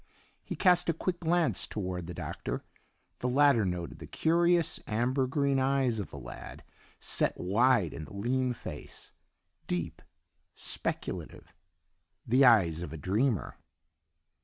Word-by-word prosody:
He - - -5
cast 180 -2 +4
a - - +3
quick 175 +1 -2
glance 170 -1 +1
toward 90 -4 -4
the 90 - -6
Doctor; - - -4 0.6
the 125 - -1
latter 140 -3 +5
noted 90 -3 -3
the - - -9
curious 170 0 +2
amber 125 +4 +1
green 140 0 +1
eyes 130 -3 +1
of 100 - -4
the - - -9
lad, 60 -3 -9 0.4
set - - 0
wide 105 - +3
in 80 - -6
the - - -13
lean 125 +4 0
face, 90 -9 -8 0.5
deep, 90 -2 -3 0.5
speculative, - - -4 0.7
the 125 +4 +4
eyes 95 -10 +5
of 85 -4 -6
a 80 - -6
dreamer. 100 - 0
125 Hz, 135 wpm, -30 LUFS, 90-140 Hz, 0.7 s, latter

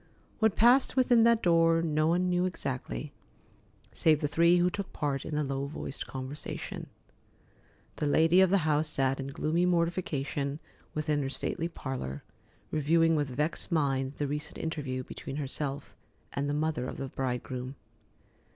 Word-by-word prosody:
What 220 -3 +3
passed 245 +4 +5
within 245 -3 +5
that 235 -1 +4
door 165 -1 +4
no 155 -1 +1
one 175 +2 +2
knew 180 0 +2
exactly, 130 - -4 0.8
save 155 -2 +3
the 150 - 0
three 170 +3 +4
who 175 +1 +3
took 200 0 -5
part 140 -3 -2
in 155 - -4
the 150 - +1
low 135 0 -2
voiced 140 -2 -6
conversation. 130 +2 -5 1.1
The 150 - 0
lady 165 +5 +5
of 190 - +5
the 190 -4 +2
house 155 0 +2
sat 135 -2 +1
in 135 - -4
gloomy 160 +5 0
mortification 155 -5 -1 0.4
within 150 -1 0
her 135 - -2
stately 160 +4 -2
parlor, 130 - -5 0.5
reviewing 165 +2 +3
with 145 -2 0
vexed 150 +8 -2
mind 135 -4 +1
the 145 - -2
recent 150 +2 -4
interview 140 -5 -3
between 135 - -7
herself 140 0 -4 0.4
and 140 +1 -1
the 145 - 0
mother 150 -4 -1
of - - -6
the 135 - -4
bridegroom. 125 0 -4
150 Hz, 155 wpm, -30 LUFS, 135-170 Hz, 1.1 s, passed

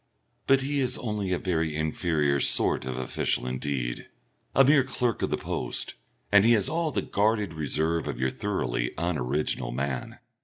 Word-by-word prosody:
But 135 0 +5
he 140 +1 -1
is 130 -2 +1
only 105 -5 -3
a 90 - +2
very 80 -4 -1
inferior 80 -2 0
sort - - +4
of 65 -1 -4
official 65 -1 -1
indeed, 65 -1 -3 0.5
a 135 - +7
mere 140 0 +5
clerk 125 -3 -1
of - - 0
the - - 0
post, - - -3 0.4
and 100 -1 +7
he 115 +2 +5
has 105 -4 +2
all 165 0 0
the 145 - -2
guarded 105 -3 0
reserve 80 +1 0
of 65 -4 -4
your 65 0 +1
thoroughly - - -2
unoriginal 75 -6 -1
man. 65 0 -3
80 Hz, 165 wpm, -27 LUFS, 70-110 Hz, 0.5 s, a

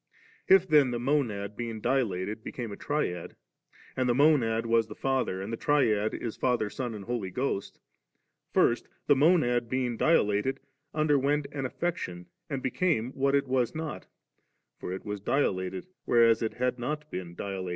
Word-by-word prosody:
If 190 -1 +6
then 150 -5 +5
the 120 - -2
Monad 115 -7 -1
being 115 -1 -4
dilated 110 -4 -1
became 120 -3 -5
a - - -5
Triad, 100 - -3 0.6
and 130 -1 +1
the 120 - +3
Monad 125 -6 +3
was 115 -1 +2
the - - -9
Father", 130 -8 -1
and 110 +4 -5
the - - -2
Triad 110 -8 +2
is 115 -3 -4
Father, 120 -5 0
Son, 125 -4 -4
and 100 -2 -8
Holy 120 -5 -3
Ghost, 125 -1 -3 0.7
first 120 - +2 0.2
the 145 - +5
Monad 130 -6 +3
being 125 -2 -1
di 165 +7 +4
lated, 105 +6 +1 0.3
underwent 145 -1 +2
an 135 -3 -2
affection 90 - -4 0.2
and 140 -3 -3
became 130 -4 0
what 135 +1 +1
it 140 -1 +1
was 125 -1 0
not; 160 -1 -5 0.7
for - - -5
it 95 - -6
was 105 -1 -4
dilated, 95 - 0 0.2
whereas 115 -1 +4
it 110 - -2
had 125 0 -1
not 150 +4 -4
been 90 -2 -6
dilate. 95 -2 -4
120 Hz, 165 wpm, -29 LUFS, 105-140 Hz, 0.7 s, If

